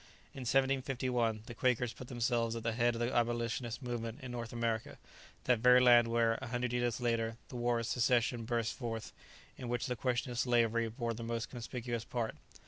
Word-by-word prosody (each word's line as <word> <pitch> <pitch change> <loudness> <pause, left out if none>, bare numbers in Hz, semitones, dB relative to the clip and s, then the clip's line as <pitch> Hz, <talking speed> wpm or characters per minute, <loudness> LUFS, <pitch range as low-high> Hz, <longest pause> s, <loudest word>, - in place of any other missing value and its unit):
In 125 -3 -4
1751, 130 -4 +1
the 120 - -7
Quakers 125 -1 +1
put 125 - -10
themselves 120 -2 0
at 115 - -5
the 115 - +1
head 120 +1 +2
of - - -4
the 120 +2 0
abolitionist 120 +1 -1
movement 115 -1 -4
in 125 - -6
North 120 -2 -5
America, 115 -2 -2 0.5
that 125 -3 +3
very 125 +2 +7
land 120 -2 +7
where, 115 -1 +2
a 130 - -5
hundred 120 0 -2
years 120 -1 0
later, 115 -2 0
the - - -9
war 120 -1 +1
of 115 - -3
secession 120 0 +2
burst 115 0 -1
forth, 115 -3 -5 0.5
in 125 - -5
which 120 +4 -1
the 125 -3 -1
question 125 +1 -1
of 120 - -3
slavery 115 -2 +2
bore 115 0 -3
the 115 - -7
most 115 0 -3
conspicuous 120 -1 -4
part. 120 -2 -2
120 Hz, 195 wpm, -34 LUFS, 115-125 Hz, 0.5 s, very